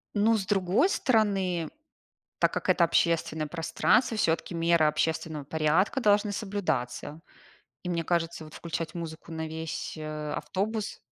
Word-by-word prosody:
Ну, 220 +2 +4
с 195 - -3
другой 195 - +2
стороны, 195 - +1 0.7
так - - +3
как - - -3
это 170 - +5
общественное 165 -2 +1
пространство, 175 - +1
всё-таки 170 -3 0
меры 165 -1 +3
общественного 155 -1 -1
порядка 160 - +1
должны 205 -2 +3
соблюдаться. 195 - -3 0.6
И 180 - -3
мне 170 -1 -1
кажется, 165 -1 -1
вот 155 - -12
включать 165 0 -4
музыку 165 -1 -7
на 160 0 -4
весь, 160 0 -5
э, 155 -1 -5
автобус. 205 +7 -3
170 Hz, 135 wpm, -28 LUFS, 160-200 Hz, 0.7 s, это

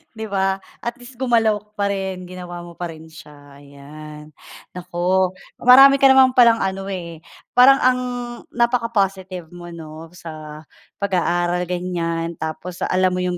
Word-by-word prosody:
'di 220 0 -5
ba? 195 0 0 0.2
At 235 - -4
least 245 0 -14
gumalaw 225 -5 +2
ka 210 +1 -30
pa 200 - -1
rin, 190 -2 -4
ginawa 175 -1 -8
mo 170 0 -12
pa 175 - -3
rin 160 0 -13
siya, 145 -2 -15
ayan. 150 +2 -12 0.4
Naku 180 +1 -1 0.3
marami 270 +3 +8
ka 275 - +6
naman 265 -1 +6
palang 235 -2 +6
ano, 195 0 -3
eh, 170 -3 -6 0.4
parang 270 +2 +7
ang 255 0 +3 0.5
napaka-positive 195 -7 -1
mo 175 0 -10
'no, 160 0 -10
sa 155 -3 -9 0.4
pag-aaral 175 -2 0
ganyan, 170 -2 -3
tapos 170 +3 -6
alam 185 0 +1
mo 180 - -2
yung 180 -1 -2
180 Hz, 150 wpm, -20 LUFS, 165-215 Hz, 0.5 s, marami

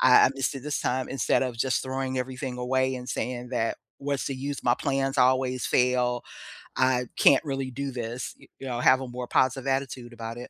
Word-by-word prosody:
I 125 -1 +7
I - - +1
missed 135 +1 -1
it 135 - -5
this 150 0 -2
time," 130 +1 -1
instead 135 0 +1
of 125 -3 -3
just 130 +2 +1
throwing 130 0 -3
everything 130 0 -4
away 130 +1 +1
and 125 0 -8
saying 125 -1 -3
that, 115 -2 -1 0.2
"What's 140 -1 -2
the 135 - -2
use? 140 +2 -4
My 120 0 +4
plans 135 0 -1
always 130 0 +3
fail. 125 -1 +2 0.5
I 130 -1 +2
can't 135 - +6
really 135 -2 -2
do 140 +2 -4
this." 120 0 -4
Y - - -17
you - - -8
know, 120 -2 -2
have 130 +2 +5
a 130 - -5
more 125 0 -6
positive 130 +1 +1
attitude 135 -3 -2
about 115 0 -6
it. 120 - -8
130 Hz, 210 wpm, -27 LUFS, 125-135 Hz, 0.5 s, I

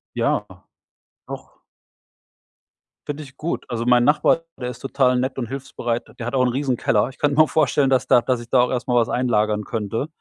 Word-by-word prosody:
Ja. - - 0 0.8
Doch. - - -10 1.5
Finde 145 +1 -5
ich 135 -1 -15
gut. 165 +4 -4
Also, 120 -1 -3
mein 125 0 +4
Nachbar, 150 +4 +3 0.2
der 125 0 -3
ist 120 - -9
total 130 -2 +1
nett 130 +1 -2
und 120 - -3
hilfsbereit. 120 -3 -4 0.2
Der 115 - -4
hat 125 - -3
auch 130 - +3
'n 125 - +2
riesen 130 -1 -1
Keller. 110 +3 +1
Ich 135 - -15
könnte 145 -1 +1
mir 155 - +8
auch 155 - -3
vorstellen, 145 -2 +2
dass 130 -2 +2
da 120 - +5
dass 125 +1 -1
ich 120 0 -11
da 125 - +4
auch 125 - +1
erst 125 -1 -3
mal 125 - +1
was 115 -1 +3
einlagern 105 -4 0
könnte. 115 +5 -3
125 Hz, 210 wpm, -21 LUFS, 120-135 Hz, 1.5 s, mir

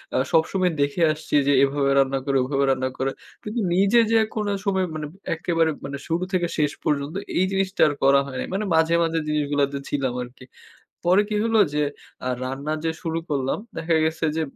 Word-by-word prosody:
আ - - +3 0.2
সবসময় 180 +3 +2
দেখে 140 +5 0
আসছি 155 -1 -4
যে, - - +5
এভাবে 140 0 +1
রান্না 135 0 +2
করে 140 -1 +1
ওভাবে 140 0 +1
রান্না 130 0 0
করে 135 +1 -1 0.3
কিন্তু 215 +3 -3
নিজে 200 +5 +4
যে, 225 - +5 0.2
কোন 210 -2 -1 0.2
সময় 190 -2 +1
মানে 155 -1 -4 0.3
একেবারে 165 -1 +1 0.2
মানে 140 +1 -5
শুরু 170 +2 0
থেকে 175 -2 +1
শেষ 150 -1 +2
পর্যন্ত 145 +2 -1 0.2
এই 185 - +3
জিনিসটা 195 0 -1
আর 150 - 0
করা 140 +1 +6
হয় 135 - -8
নাই। - - -3
মানে 205 +2 -1
মাঝে, 160 +1 +3
মাঝে 165 0 0
জিনিসগুলাতে 145 -2 0
ছিলাম 135 -3 -1
আরকি। 125 +1 -13 0.6
পরে 185 +3 +5
কি 215 - -1
হলো 225 -1 +2 0.2
যে, 150 - +2 0.4
আ - - +1 0.2
রান্না 135 +4 -3
যে, 165 - +1
শুরু 165 0 -2
করলাম 135 -3 -1 0.2
দেখা 165 0 0
গেছে 160 +1 -1
যে, 160 - +1
155 Hz, 195 wpm, -23 LUFS, 140-180 Hz, 0.6 s, করা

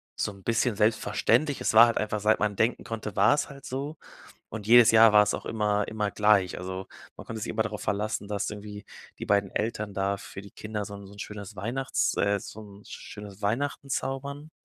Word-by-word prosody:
so - - -2
'n 100 - -15
bisschen 115 0 +1
selbstverständlich. 115 +6 +2
Es - - 0
war 115 +2 +9
halt 115 - -1
einfach 105 0 -2
seit 110 +1 +3
man 105 -1 0
denken 115 +4 0
konnte, 110 -3 -6
war's 140 +9 +3
halt 140 -1 -12
so 140 +4 -5 0.5
und 105 -2 -7
jedes 120 0 +8
Jahr 115 -1 +7
war's 105 0 +5
auch - - -6
immer 105 -2 0
immer 105 -2 -2
gleich. 105 -4 +2
Also, 95 +1 -6 0.3
man - - -10
konnte 110 -1 -6
sich 110 - -4
immer 110 - +1
darauf 105 -2 -5
verlassen, 105 +2 -2
dass 100 -1 -2
irgendwie 105 0 -8 0.4
die - - -4
beiden 100 -1 +2
Eltern 110 -2 -3
da 100 +1 0
für 95 - -9
die 100 0 -13
Kinder 105 -1 -5
so 100 0 -8
'n 100 -1 -10
so 100 - -14
'n 100 - -11
schönes 105 0 -8
Weihnachts 100 - -1
äh, 100 0 +1
so - - -10
'n 100 -1 -14
schönes 105 -1 -10
Weihnachten 140 +7 -1
zaubern. 140 +3 -4
105 Hz, 210 wpm, -27 LUFS, 100-115 Hz, 0.5 s, war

